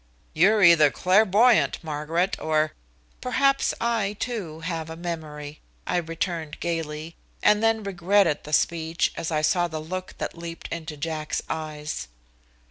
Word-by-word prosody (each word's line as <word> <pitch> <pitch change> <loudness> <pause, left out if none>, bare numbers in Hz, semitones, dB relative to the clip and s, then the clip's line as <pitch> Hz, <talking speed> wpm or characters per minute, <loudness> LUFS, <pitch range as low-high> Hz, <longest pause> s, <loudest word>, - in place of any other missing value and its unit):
"You're 200 +6 +4
either 165 -4 +7
clairvoyant, 210 - +4
Margaret 160 +4 -1
or 155 0 +1 0.2
" - - -35
"Perhaps 275 +2 +2
I, 225 -4 0
too, 185 -11 -4
have 165 -2 -4
a 160 - -6
memory," 155 -3 -6 0.3
I - - 0
returned 165 -2 -3
gayly, 165 -1 -4 0.3
and 210 0 +5
then 225 -1 +2
regretted 190 -3 +2
the 150 - -9
speech 165 +1 +1
as 165 - -3
I 155 -2 0
saw 175 +3 +2
the 160 -2 -5
look 185 +4 -6
that - - -4
leaped 170 0 -7
into 160 -2 -6
Jack's 155 0 -3
eyes. 150 - -4
165 Hz, 140 wpm, -25 LUFS, 155-190 Hz, 0.3 s, either